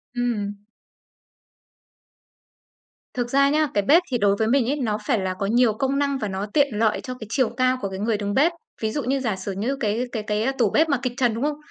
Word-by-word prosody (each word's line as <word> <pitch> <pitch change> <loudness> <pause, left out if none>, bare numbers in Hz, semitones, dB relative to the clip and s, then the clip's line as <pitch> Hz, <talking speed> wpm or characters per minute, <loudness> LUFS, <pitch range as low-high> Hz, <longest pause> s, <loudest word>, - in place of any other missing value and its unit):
Ừm. 220 -4 -1 2.6
Thực 245 -1 -2
ra 275 +2 +4
nhá, 305 +1 +2
cái 205 - +1
bếp 320 - +5
thì 245 - +2
đối 200 -3 +3
với 220 +2 0
mình 245 0 +2
ấy, 285 - +1
nó 225 -7 -1
phải 240 -7 +2
là 190 -1 -2
có 195 - -1
nhiều 230 +2 +3
công 270 +5 -1
năng 280 -1 0
và 215 - -3
nó 190 +1 -3
tiện 285 -2 +4
lợi 220 0 +1
cho 255 - -6
cái 235 -4 -9
chiều 255 0 +1
cao 255 0 +2
của 200 - -2
cái 190 0 -6
người 215 +1 0
đứng 205 -1 -3
bếp. 300 +8 +4 0.3
Ví 220 -1 0
dụ 290 +4 -2
như 270 +2 0
giả 225 -6 -1
sử 190 +1 -5
như 215 +8 -2
cái 220 0 0
cái 220 -3 -3
cái 210 +2 -1
tủ 230 -5 +3
bếp 315 +9 +2
mà 280 - +2
kịch 255 -2 -1
trần, 245 -4 +2
đúng 230 +4 -3
không? 295 0 -1
240 Hz, 240 wpm, -23 LUFS, 210-275 Hz, 2.6 s, bếp